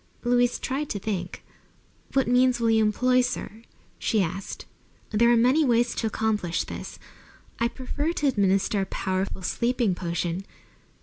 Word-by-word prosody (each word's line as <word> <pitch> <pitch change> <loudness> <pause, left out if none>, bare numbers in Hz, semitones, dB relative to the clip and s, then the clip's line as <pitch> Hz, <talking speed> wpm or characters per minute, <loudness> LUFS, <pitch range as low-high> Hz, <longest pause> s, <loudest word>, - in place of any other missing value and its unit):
Louise 245 0 +2
tried 280 +3 -3
to - - -2
think. 190 -3 -4 0.7
"What 270 -1 +2
means 250 0 +3
will 230 -1 +2
you 220 0 +4
employ, 250 +4 +3
sir?" 245 -3 -4 0.4
she 220 - +1
asked. 185 +3 -5 0.5
"There 235 +2 +4
are 240 - +5
many 255 +7 +4
ways 240 -2 +2
to 225 - -1
accomplish 210 -5 -1
this. - - -8 0.6
I 235 - +3
prefer 285 +6 -3
to 295 - 0
administer 195 -4 +2
a 190 - -2
powerful 190 0 -2
sleeping 235 +1 0
potion. 175 +1 -3
225 Hz, 145 wpm, -26 LUFS, 195-250 Hz, 0.7 s, are